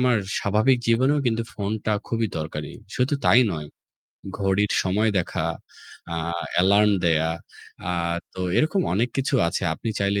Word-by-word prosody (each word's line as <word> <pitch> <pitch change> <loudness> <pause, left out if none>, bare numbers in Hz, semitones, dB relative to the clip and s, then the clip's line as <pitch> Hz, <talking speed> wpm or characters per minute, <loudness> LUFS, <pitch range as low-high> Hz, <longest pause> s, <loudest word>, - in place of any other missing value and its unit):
আমার 125 -1 +3 0.2
স্বাভাবিক 110 +6 +2
জীবনেও 130 +6 +3
কিন্তু 115 -1 +1
ফোনটা 105 +1 -2 0.2
খুবই 115 -1 0
দরকারি। 75 -1 -5 0.2
শুধু 130 +3 +1
তাই 120 - +6
নয়, 75 -2 -5 0.7
ঘড়ির 100 +1 +1
সময় 105 +4 +1
দেখা, 90 - -2 0.7
আ - - -3 0.4
অ্যালার্ম 100 +4 +4
দেয়া। 80 -1 +2 0.6
আ - - 0 0.4
তো 95 - -6 0.2
এরকম 160 +5 +2
অনেক 115 +5 +1
কিছু 135 +1 0
আছে। - - -3
আপনি 115 - -5
চাইলে 100 0 +1
105 Hz, 140 wpm, -24 LUFS, 95-120 Hz, 0.7 s, তাই